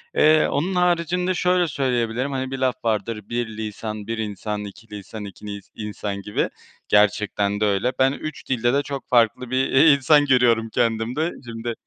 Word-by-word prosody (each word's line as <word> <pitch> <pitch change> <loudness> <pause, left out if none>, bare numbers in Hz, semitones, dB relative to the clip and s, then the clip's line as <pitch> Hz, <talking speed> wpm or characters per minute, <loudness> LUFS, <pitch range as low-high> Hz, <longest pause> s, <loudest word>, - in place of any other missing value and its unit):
Eee, 155 0 +5
onun 180 +6 -1
haricinde 180 +1 +1
şöyle 180 0 +2
söyleyebilirim, 125 -2 -1
hani 130 -1 -3
bir 135 - -3
laf 130 -1 +1
vardır, 105 -1 -2
bir 120 0 -1
lisan, 110 -1 -5
bir 115 0 -3
insan, 105 -1 -4
iki 105 +3 -12
lisan, 105 +2 -8
iki 100 +1 -11
nis 100 -2 -7
insan 105 -2 -5
gibi. 105 +1 -1 0.4
Gerçekten 105 0 +2
de 105 - +2
öyle. 100 +5 +1
Ben 130 0 +4
3 155 +1 -7
dilde 120 -1 +1
de 140 - +3
çok 140 -1 -6
farklı 120 +1 +2
bir 130 +1 +1
i 150 +3 +6
insan 145 +1 +4
görüyorum 120 -4 +3
kendimde. 120 +8 0
Şimdi 115 0 -5
120 Hz, 170 wpm, -23 LUFS, 105-140 Hz, 0.4 s, i